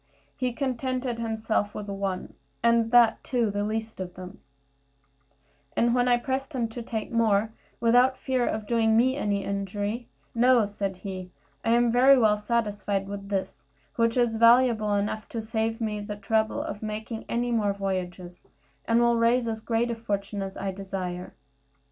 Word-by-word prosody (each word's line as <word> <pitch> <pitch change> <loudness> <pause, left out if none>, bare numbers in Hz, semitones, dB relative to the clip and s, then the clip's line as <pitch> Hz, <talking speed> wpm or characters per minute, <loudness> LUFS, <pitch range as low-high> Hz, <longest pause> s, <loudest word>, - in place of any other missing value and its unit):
He 255 -1 -1
contented 255 -1 -2
himself 220 -2 -1
with 210 - -5
one, 195 -2 -3 0.3
and 235 -1 +3
that, 235 -2 +5
too, 235 -5 0
the 205 0 -1
least 220 +1 -3
of 180 -1 -6
them; 185 +2 -10 1.4
and 235 0 +3
when 245 0 +2
I 245 -1 +4
pressed 265 +3 -3
him 240 -3 0
to 240 +2 -6
take 225 -2 -4
more, 220 -2 +2 0.3
without 245 +3 +4
fear 260 -2 0
of 215 -1 -2
doing 225 0 +2
me 260 +3 +3
any 205 -7 -1
injury, 205 +4 -3 0.3
"No," 240 -1 +4
said 200 -2 -4
he, 185 -1 -6 0.3
"I 230 - +2
am 240 0 +3
very 260 +3 +6
well 215 -4 +4
satisfied 210 -3 -1
with 200 0 -7
this, 195 -2 -3 0.3
which 230 -1 +1
is 235 -2 +2
valuable 230 -2 +5
enough 210 +1 -2
to 230 - -4
save 225 0 -2
me 215 -2 -2
the 205 0 -5
trouble 220 +2 0
of 205 - -6
making 220 +1 -5
any 240 +1 0
more 215 -3 +2
voyages, 185 -2 -4 0.4
and 230 +1 +3
will 235 0 +3
raise 235 +1 +3
as 220 -1 -3
great 230 +1 0
a - - -2
fortune 205 -2 -3
as 195 0 -5
I 195 - -2
desire." 185 -2 -5
220 Hz, 165 wpm, -26 LUFS, 200-235 Hz, 1.4 s, very